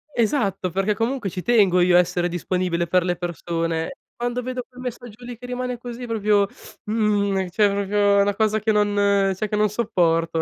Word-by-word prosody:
Esatto, 210 - 0
perché 195 +3 0
comunque 230 -2 -1
ci 180 - -5
tengo 200 -7 +4
io 175 0 +4
a - - +8
essere 175 0 +1
disponibile 175 0 -1
per 180 +1 +2
le 180 -1 0
persone. 165 +3 -3 0.2
Quando 245 +1 -2
vedo 255 0 -4
quel 250 0 -13
messaggio 245 -2 -8
lì 240 -1 -8
che 245 - -11
rimane 250 0 -3
così 245 0 -7
proprio 210 -2 +2 0.4
mhmm, 205 -3 0
cioè 205 +3 +3
proprio 200 0 +2
è - - +5
una 200 0 +1
cosa 215 0 +1
che 220 +1 +1
non 205 -1 +1 0.4
cioè 215 +3 -2
che 210 - -2
non 210 0 +2
sopporto. 165 -7 +1
205 Hz, 190 wpm, -22 LUFS, 180-235 Hz, 0.4 s, a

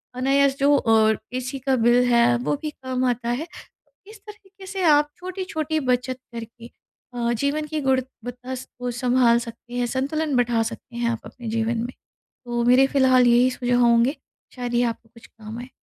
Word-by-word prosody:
अनायास 275 +2 +2
जो 285 +1 +4
अ, 220 -2 +3 0.2
ऐसी 255 +2 -4
का 265 0 +1
बिल 240 +1 +4
है, 235 0 +4
वो 255 +4 -1
भी 305 -1 -4
कम 260 -2 -3
आता 235 -1 -2
है। 270 +8 -2 0.6
इस 430 0 -13
तरीक़े 395 -2 -14
से 385 -1 -4
आप 295 -2 +4
छोटी-छोटी 355 -4 -3
बचत 255 -1 -1
करके 230 +1 -9 0.4
अ, 235 -1 -1
जीवन 285 +5 -1
की 305 0 -3
गुणवत्ता 260 -1 -3
को 245 -1 -6
सँभाल 245 -1 +3
सकते 235 0 -10
हैं, 245 0 0
संतुलन 285 +3 -1
बढ़ा 235 -2 +2
सकते 235 +2 -8
हैं 235 -1 0
आप 230 - -3
अपने 240 -2 -10
जीवन 225 +1 -1
में। 245 - -6 0.6
तो 240 0 0
मेरे 250 +2 +6
फिलहाल 260 -3 +4
यही 240 +2 +5
सुझाव 245 -1 0
होंगे, 235 +4 +4 0.4
शायद 245 -1 -4
ये 240 +1 +3
आपको 225 0 -14
कुछ 230 - -16
काम 220 0 -10
आएँ। 250 +2 -9
250 Hz, 180 wpm, -23 LUFS, 235-275 Hz, 0.6 s, मेरे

